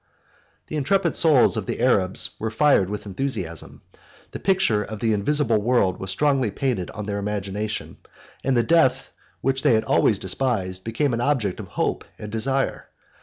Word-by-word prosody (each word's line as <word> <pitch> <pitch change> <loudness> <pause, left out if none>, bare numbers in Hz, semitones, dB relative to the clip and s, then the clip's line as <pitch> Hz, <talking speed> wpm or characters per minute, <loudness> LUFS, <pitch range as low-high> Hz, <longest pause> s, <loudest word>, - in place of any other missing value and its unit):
The 155 - -5
intrepid 170 +4 +1
souls 155 -7 +4
of - - -4
the - - -3
Arabs 95 -1 +2
were 110 - -2
fired 110 -5 +3
with 105 +1 -5
enthusiasm: 95 - -5 0.5
the - - -6
picture 190 - +2
of 110 +1 -7
the 110 0 +1
invisible 115 +1 +1
world 105 -5 +1
was 95 - -5
strongly 135 +3 +1
painted 115 -5 -2
on 105 -2 -6
their 100 -1 -3
imagination; 105 +1 -4 0.5
and 135 -2 +1
the 120 - +3
death 165 -4 +2 0.3
which 135 0 0
they 120 - +4
had 110 - +1
always 105 - +3
despised 95 -3 -1
became 120 +4 -1
an 115 - -1
object 120 -9 0
of - - -7
hope - - -2
and 105 0 -8
desire. 135 +5 -1
110 Hz, 170 wpm, -23 LUFS, 100-135 Hz, 0.5 s, souls